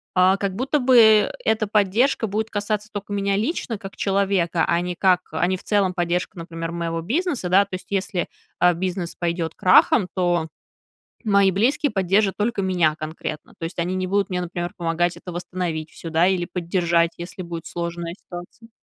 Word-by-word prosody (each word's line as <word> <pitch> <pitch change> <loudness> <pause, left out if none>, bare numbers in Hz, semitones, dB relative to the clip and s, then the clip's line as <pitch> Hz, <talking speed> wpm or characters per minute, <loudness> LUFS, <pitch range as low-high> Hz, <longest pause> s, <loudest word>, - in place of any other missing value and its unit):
а, 185 +1 +5
как 195 -1 -2
будто 265 +6 0
бы, 255 -1 +4
э, 220 -2 +6
эта 220 0 +1
поддержка 215 +4 +2
будет 215 +2 -2
касаться 210 0 -2
тока 205 0 -6
меня 200 0 0
лично, 230 - -2
как 195 -1 -9
человека, 195 -4 +1
а 170 - +2
не 180 0 -3
как 180 0 +3
а 160 +2 +1
не 185 - +1
в - - -15
целом 200 -3 +1
поддержка, 175 0 -1
например, 165 0 -5
моего 165 -1 -2
бизнеса, 270 - -1
да. 190 +3 +6
То 195 - -6
есть, 185 - -9
если, 190 -3 -1 0.3
а, 180 0 +5
бизнес 175 0 -3
пойдет 170 -1 -2
крахом, 185 +2 +5
то 175 -3 +1 0.8
мои 200 -3 +4
близкие 260 - +1
поддержат 195 +1 +2
только 210 -1 0
меня 175 -5 +2
конкретно, 155 0 -6
то - - -10
есть 165 - -7
они 175 +2 -1
не 185 0 -2
будут 200 +2 +1
мне, 180 0 -1
например, 175 0 -4
помогать 175 0 0
это 180 - -9
восстановить 175 -2 -4
всё, 165 - -8
да, 165 +2 +3
или 185 -2 +1
поддержать, 170 -1 +1
если 180 +2 -7
будет 170 -1 -6
сложная 170 0 -4
ситуация. 175 +6 -11
185 Hz, 185 wpm, -23 LUFS, 170-205 Hz, 0.8 s, э